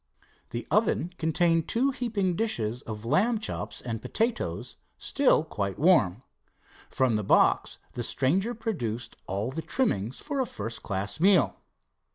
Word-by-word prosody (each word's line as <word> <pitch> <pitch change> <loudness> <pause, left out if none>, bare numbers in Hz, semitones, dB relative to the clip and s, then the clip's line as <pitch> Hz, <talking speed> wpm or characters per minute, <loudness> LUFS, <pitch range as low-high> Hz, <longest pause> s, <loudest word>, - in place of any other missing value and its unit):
The 120 - -4
oven 185 -5 +2
contained 165 0 +2
two 265 +4 +2
heaping 215 -9 -1
dishes 120 - -1
of 110 -1 -7
lamb 205 - +3
chops, 220 - -5
and 115 -3 -4
potatoes, 230 +1 -2 0.2
still 275 - +3
quite 100 -11 -3
warm. 130 - +3 0.7
From 125 -4 +2
the 105 - -2
box - - +3 0.2
the 120 - -4
stranger 180 - +1
produced 125 - -3
all 100 +6 -2
the 160 +4 -4
trimmings 125 - -1
for 290 -2 -4
a 260 - +1
first 110 - -5
class 100 +5 -3
meal. 190 +2 +4
160 Hz, 140 wpm, -28 LUFS, -, 0.7 s, meal